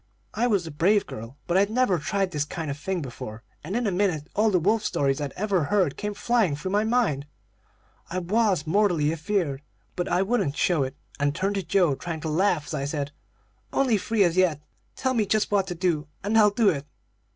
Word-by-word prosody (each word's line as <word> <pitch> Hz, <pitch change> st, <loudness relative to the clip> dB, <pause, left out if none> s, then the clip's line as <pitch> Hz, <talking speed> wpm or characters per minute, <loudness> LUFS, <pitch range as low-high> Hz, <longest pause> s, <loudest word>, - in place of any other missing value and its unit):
I 240 Hz, +3 st, +1 dB
was 200 Hz, -7 st, +1 dB
a 160 Hz, -, -6 dB
brave 195 Hz, +8 st, +3 dB
girl, 115 Hz, +5 st, -9 dB
but 175 Hz, +1 st, +1 dB
I'd 200 Hz, +1 st, +3 dB
never 220 Hz, -6 st, +2 dB
tried 195 Hz, +3 st, -1 dB
this 150 Hz, -3 st, 0 dB
kind 155 Hz, 0 st, -4 dB
of 140 Hz, -, -5 dB
thing 185 Hz, -1 st, -2 dB
before, 115 Hz, -3 st, -8 dB, 0.2 s
and 180 Hz, +8 st, -4 dB
in 240 Hz, 0 st, 0 dB
a 205 Hz, -, +1 dB
minute 180 Hz, -5 st, 0 dB
all 215 Hz, +2 st, +3 dB
the 190 Hz, -, +3 dB
wolf 210 Hz, +6 st, +2 dB
stories 135 Hz, -5 st, 0 dB
I'd 145 Hz, -2 st, -3 dB
ever 190 Hz, -5 st, 0 dB
heard 185 Hz, -3 st, +1 dB
came 210 Hz, -1 st, -4 dB
flying 215 Hz, -7 st, +1 dB
through 170 Hz, +6 st, -5 dB
my 205 Hz, +2 st, +2 dB
mind. 220 Hz, -, +1 dB, 0.8 s
I 180 Hz, -, -3 dB
was 185 Hz, -2 st, +1 dB
mortally 170 Hz, -4 st, +2 dB
afeard, 160 Hz, -3 st, -1 dB, 0.3 s
but 175 Hz, -, -2 dB
I 180 Hz, +2 st, +2 dB
wouldn't 195 Hz, -9 st, 0 dB
show 175 Hz, -5 st, +2 dB
it, 135 Hz, 0 st, -2 dB, 0.2 s
and 145 Hz, 0 st, +1 dB
turned 195 Hz, +4 st, 0 dB
to 200 Hz, -, -1 dB
Joe, 175 Hz, -2 st, +2 dB
trying 160 Hz, +3 st, -5 dB
to 160 Hz, -, -3 dB
laugh 170 Hz, -1 st, +1 dB
as 140 Hz, -, -7 dB
I 140 Hz, -2 st, -2 dB
said: 145 Hz, 0 st, -3 dB, 0.6 s
'Only 250 Hz, -6 st, +2 dB
three 215 Hz, +2 st, +2 dB
as 175 Hz, -1 st, +1 dB
yet. 175 Hz, -6 st, +3 dB, 0.4 s
Tell 260 Hz, -1 st, 0 dB
me 220 Hz, -4 st, +1 dB
just 215 Hz, +1 st, +1 dB
what 195 Hz, -2 st, +2 dB
to 180 Hz, -, -4 dB
do, 165 Hz, -4 st, 0 dB, 0.2 s
and 205 Hz, +3 st, 0 dB
I'll 215 Hz, -2 st, +7 dB
do 210 Hz, 0 st, +3 dB
it.' 145 Hz, -5 st, -2 dB
180 Hz, 220 wpm, -25 LUFS, 150-205 Hz, 0.8 s, I'll